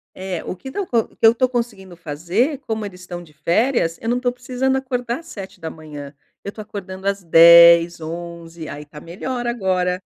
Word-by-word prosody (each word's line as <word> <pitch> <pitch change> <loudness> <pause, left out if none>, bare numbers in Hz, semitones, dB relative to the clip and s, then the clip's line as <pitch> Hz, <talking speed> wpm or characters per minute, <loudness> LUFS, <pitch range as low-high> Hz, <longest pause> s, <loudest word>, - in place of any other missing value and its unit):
É, 185 -2 -5
o - - -5
que 265 +7 -9
tão 405 - -2
co 240 -10 0
o - - -7
que - - -7
eu 225 - +9
tô 255 +1 +2
conseguindo 215 -7 -4
fazer, 175 - -1
como 220 -1 -2
eles 185 -3 -8
estão 175 -1 -7
de 160 -3 -17
férias, 170 - +1
eu 225 - -5
não 245 +1 +1
tô 250 0 0
precisando 255 +2 -1
acordar 250 -1 -3
às 335 - -18
7h. 160 - -9 0.3
Eu 200 - -5
tô 215 - -11
acordando 195 -2 -8
às 200 0 0
10, 170 0 +7
11, 170 0 -7
aí 145 +1 -7
tá 150 0 -12
melhor 240 +10 -5
agora 185 -6 0
190 Hz, 195 wpm, -20 LUFS, 170-240 Hz, 0.3 s, eu